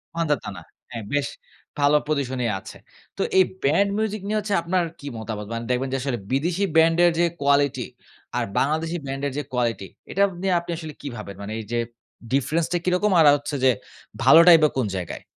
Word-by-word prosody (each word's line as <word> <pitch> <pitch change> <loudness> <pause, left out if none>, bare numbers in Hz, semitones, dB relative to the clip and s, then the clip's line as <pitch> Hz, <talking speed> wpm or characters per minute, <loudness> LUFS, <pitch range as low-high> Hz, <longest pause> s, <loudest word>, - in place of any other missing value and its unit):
মান্ধাতা 150 -10 -1
না। - - -9 0.3
হ্যাঁ, 115 -3 -6
বেশ 145 -1 +1 0.5
ভালো 145 +1 +4
পজিশনেই 130 -6 -1
আছে। - - -11 0.4
তো - - -2 0.2
এই 190 - +8 0.2
ব্যান্ড 170 +9 +3
মিউজিক 215 -2 -2
নিয়ে 215 +1 0
হচ্ছে 205 -1 -3
আপনার 180 +1 0 0.2
কি 145 - -9
মতামত? 110 -2 -5
মানে 115 0 -4
দেখবেন 130 +2 0
যে - - +1
আসলে 130 -3 -2
বিদেশি 170 +8 0
ব্যান্ডের 165 +2 +5
যে 175 - +4 0.2
কোয়ালিটি 140 -1 +2 0.5
আর - - +1
বাংলাদেশি 160 +4 0
ব্যান্ডের 135 +1 -3
যে 145 - -1
কোয়ালিটি 115 -6 -1 0.2
এটা 200 - +2 0.2
নিয়ে 190 -1 +1
আপনি 170 0 -7
আসলে 160 -2 -7
কি 145 - -6
ভাবেন? 100 - -8
মানে 105 +2 -5
এই - - -5
যে 120 - 0 0.5
ডিফরেন্সটা 160 +5 +1
কিরকম 180 +3 +2
আর 160 - +6
আ - - +8
হচ্ছে 145 +1 -5
যে 130 - +7 0.5
ভালোটাই 170 +1 +8
বা 150 - +5
কোন 130 - +1
জায়গায়? 90 -3 -5
145 Hz, 185 wpm, -23 LUFS, 130-170 Hz, 0.5 s, এই